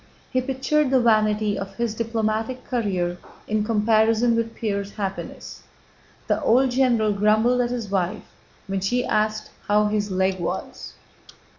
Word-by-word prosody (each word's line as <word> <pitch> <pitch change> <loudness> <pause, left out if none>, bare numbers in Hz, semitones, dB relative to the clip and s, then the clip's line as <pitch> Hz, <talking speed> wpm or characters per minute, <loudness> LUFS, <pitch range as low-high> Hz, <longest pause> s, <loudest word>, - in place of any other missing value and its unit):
He 255 - +1
pictured 270 +3 0
the 265 -1 +4
vanity 215 -3 +2
of 195 0 -7
his 235 -2 -1
diplomatic 225 +1 -2
career 185 -8 -1 0.3
in 215 0 0
comparison 225 +1 +3
with 230 0 -2
Pierre's 200 -2 -3
happiness. 195 -2 -6 0.6
The - - 0
old 255 +2 +3
general 240 -5 +2
grumbled 215 +5 +3
at 240 - 0
his 240 -3 -3
wife 190 +1 -1 0.4
when 195 -1 -2
she 245 +6 0
asked 215 0 -1 0.2
how 210 +1 +3
his 210 0 -1
leg 190 0 0
was. 175 - -5
215 Hz, 140 wpm, -23 LUFS, 205-240 Hz, 0.6 s, the